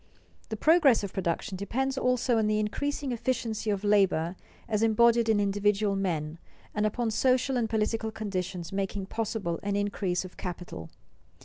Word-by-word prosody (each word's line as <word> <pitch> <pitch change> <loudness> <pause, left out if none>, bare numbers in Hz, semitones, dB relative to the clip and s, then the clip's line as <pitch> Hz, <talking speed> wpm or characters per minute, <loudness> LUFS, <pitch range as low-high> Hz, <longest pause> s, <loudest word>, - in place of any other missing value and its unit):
The 220 - -3
progress 300 -6 +5
of 200 - -5
production 185 +1 -2
depends 265 +7 -1
also 250 -2 +1
on 220 - +2
an - - +1
increasing 255 +7 -1
efficiency 230 -2 -2
of 200 -1 -1
labor 190 -5 +2 0.3
as 215 -1 0
embodied 230 +1 +4
in 215 -2 +4
individual 205 0 +1
men, 165 -5 -2 0.3
and 210 0 +1
upon 230 +1 -1
social 255 +3 +2
and 235 -3 0
political 220 0 0
conditions 185 -5 -4
making 195 0 -2
possible 210 -5 -3
an 200 0 -2
increase 200 -3 -1
of 185 - -12
capital. 175 - -6
210 Hz, 150 wpm, -28 LUFS, 195-230 Hz, 0.3 s, progress